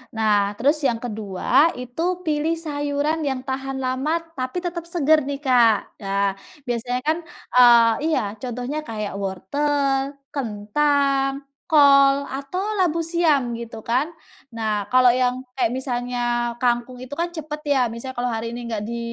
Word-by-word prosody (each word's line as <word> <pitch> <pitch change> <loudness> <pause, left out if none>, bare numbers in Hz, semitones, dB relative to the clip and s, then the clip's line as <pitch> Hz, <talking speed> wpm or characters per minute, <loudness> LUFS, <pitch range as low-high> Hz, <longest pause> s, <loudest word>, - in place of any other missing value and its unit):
Nah, 210 -2 +2
terus 285 +8 +2
yang 240 - +1
kedua, 220 - +1
itu 250 +4 -6 0.2
pilih 310 0 0
sayuran 295 -1 -2
yang 265 -2 -2
tahan 265 0 -4
lama 260 +5 0 0.2
tapi 255 +7 -3
tetap 340 -1 -4
segar 310 -4 +2
nih, 285 0 -4
Kak. 240 -5 +3
Nah, 200 -1 0 0.3
biasanya 245 0 -2
kan, 310 +2 +1 0.4
eee 235 -2 +7 0.2
iya. 320 - +2 0.2
Contohnya 250 +4 -4
kayak 215 -2 -4
wortel, 275 +8 -1 0.2
kentang, 275 +3 0 0.3
kol, 280 -2 +6
atau 275 +6 -5 0.2
labu 335 -3 +2
siam 320 -7 +1
gitu 230 -1 -7
kan. 255 +8 0 0.4
Nah, 215 -3 -1
kalau 255 0 +6
yang 250 +1 +2 0.2
kayak 250 -4 +1
misalnya 245 -1 -3 0.4
kangkung 245 0 0
itu 255 +3 -7
kan 340 +2 -2
cepat 310 -2 -6
ya. 285 -3 +2
Misalnya 235 +3 -6
kalau 245 - 0
hari 230 -1 -3
ini 240 - -6
nggak 220 -3 -3
di 235 +2 -4
260 Hz, 145 wpm, -22 LUFS, 235-290 Hz, 0.4 s, eee